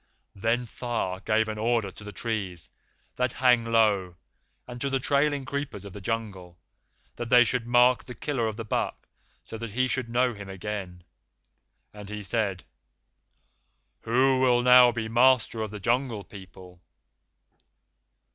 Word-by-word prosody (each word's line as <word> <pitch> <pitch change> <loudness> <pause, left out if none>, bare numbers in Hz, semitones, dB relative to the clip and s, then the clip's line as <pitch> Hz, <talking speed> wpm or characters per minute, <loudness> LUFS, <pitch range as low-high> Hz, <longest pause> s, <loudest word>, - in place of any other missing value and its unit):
Then 115 +5 0
Tha 115 -6 -4
gave 110 0 +2
an 110 0 -5
order 115 -3 0
to 105 - -14
the 105 - -8
trees 95 -4 -4 0.5
that 125 -1 0
hang 125 -2 +3
low, 105 -6 +2 0.5
and 120 -1 -9
to 140 - 0
the 135 - +1
trailing 140 +1 +1
creepers 140 -8 -5
of 100 - -9
the 105 - -9
Jungle, 95 -5 -5 0.6
that 120 -1 -5
they 125 0 +7
should 120 0 -1
mark 125 +1 +4
the 125 - -9
killer 135 -6 -2
of 110 -1 -5
the 115 - -5
buck - - -3 0.4
so 110 - -8
that 115 0 -5
he 130 +2 +1
should 130 -1 -1
know 125 +1 +1
him 100 -2 -10
again, 95 -2 -6 0.9
and 105 -1 -10
he 105 0 -6
said, 100 -3 -1 1.4
'Who 130 +3 +2
will 125 -2 +3
now 125 0 +7
be 115 -2 -4
master 120 -1 +3
of 110 - -3
the 105 0 -8
Jungle 120 0 -1
People? 95 -3 -14
115 Hz, 155 wpm, -26 LUFS, 100-125 Hz, 1.4 s, they